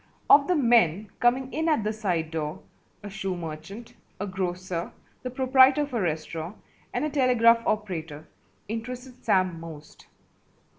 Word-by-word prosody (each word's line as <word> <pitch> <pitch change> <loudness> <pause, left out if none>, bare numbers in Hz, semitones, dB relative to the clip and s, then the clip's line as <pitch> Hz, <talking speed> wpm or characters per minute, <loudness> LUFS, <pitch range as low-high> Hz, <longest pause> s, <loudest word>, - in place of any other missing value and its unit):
Of 280 -1 +7
the 360 - +2
men 215 - +3
coming 255 +2 +1
in 320 +2 0
at 300 -9 +2
the 215 +1 -1
side 180 -7 -2
door, 160 +2 -4 0.4
a 205 - -6
shoe 195 -2 -3
merchant, 170 +7 -8 0.3
a 205 - -2
grocer, 185 -2 -3 0.3
the 255 - -4
proprietor 260 +2 +4
of 285 - -7
a 235 - 0
restaurant, 160 +2 -3 0.3
and 245 +5 -1
a - - -1
telegraph 240 -4 +4
operator 165 -8 -3 0.4
interested 250 +3 -7
Sam 185 -6 +1
most. 155 -2 -11
210 Hz, 145 wpm, -26 LUFS, 170-250 Hz, 0.4 s, Of